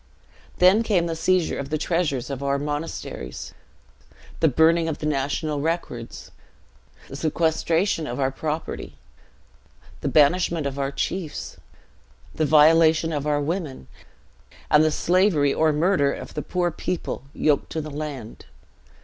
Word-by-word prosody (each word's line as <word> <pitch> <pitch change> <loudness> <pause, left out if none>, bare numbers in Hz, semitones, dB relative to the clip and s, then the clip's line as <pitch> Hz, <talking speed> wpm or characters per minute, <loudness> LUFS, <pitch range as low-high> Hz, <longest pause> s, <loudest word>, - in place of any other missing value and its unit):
Then 185 +5 +5
came 200 -7 +1
the 165 -1 -2
seizure 180 +1 +1
of 140 0 -5
the 155 - 0
treasures 150 -5 -1
of 135 -1 -5
our 140 0 0
monasteries, 145 - -5 0.9
the 160 - +4
burning 160 +4 +3
of 155 - -3
the - - -6
national 145 +1 -1
records, 150 -7 -4 0.8
the 135 - -9
sequestration 160 +2 0
of 125 0 -5
our 135 -1 +1
property, 155 +3 -5 1.0
the - - -3
banishment 160 +1 +3
of 140 0 -3
our 135 0 -1
chiefs, 170 +2 -4 0.8
the 155 - 0
violation 160 +1 +5
of 145 0 -2
our 145 -1 +1
women, 150 - -3 0.9
and 150 +1 +6
the 155 - +3
slavery 165 -3 +2
or 160 0 +3
murder 150 -2 +2
of - - -7
the 150 - -3
poor 175 +1 -1
people 165 -3 -4
yoked 145 -2 +1
to 160 - -2
the 155 0 -6
land. 140 -6 -7
155 Hz, 140 wpm, -24 LUFS, 140-165 Hz, 1.0 s, and